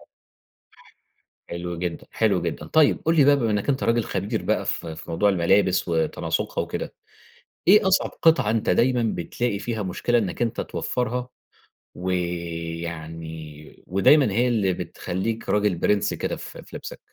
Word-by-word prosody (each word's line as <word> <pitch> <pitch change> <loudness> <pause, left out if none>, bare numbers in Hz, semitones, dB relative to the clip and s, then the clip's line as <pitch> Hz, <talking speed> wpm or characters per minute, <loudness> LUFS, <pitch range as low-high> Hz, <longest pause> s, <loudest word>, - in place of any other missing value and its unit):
ح - - -18 1.5
حلو 85 0 -4
جدًا، 85 -1 -4
حلو - - +2
جدًا. - - -4
طيب، 155 -2 +4
قُل 165 +1 +3
لي 150 - +6
بقى 145 0 +6
بما 115 -6 0
إنّك 105 +5 -1
أنت 135 -1 +1
راجل 115 0 +2
خبير 105 +4 -2
بقى - - 0
في 80 -1 -3
في - - -9
موضوع 100 +5 +3
الملابس 95 +1 +2
وتناسُقها 80 -2 -1
وكده، - - -5 0.8
إيه 200 0 +7
أصعب 190 - +2
قِطعة 160 -10 +4
أنت 110 -1 +1
دايمًا 120 +6 +3
بتلاقي 100 +5 -2
فيها 110 0 -3
مشكلة 110 +6 0
إنّك 100 -1 -2
أنت 120 -1 -1
توفّرها 125 0 -2 0.7
ويعني 85 -3 -5
ودايمًا 105 - +5
هي 120 +5 +2
اللي 105 -6 +1
بتخلّيك 105 +6 -4
راجل 105 -2 +2
بِرِنس 100 +4 +1
كده - - -2
في - - -9
في - - -13
لِبسك؟ - - -7
100 Hz, 150 wpm, -24 LUFS, 85-120 Hz, 1.5 s, إيه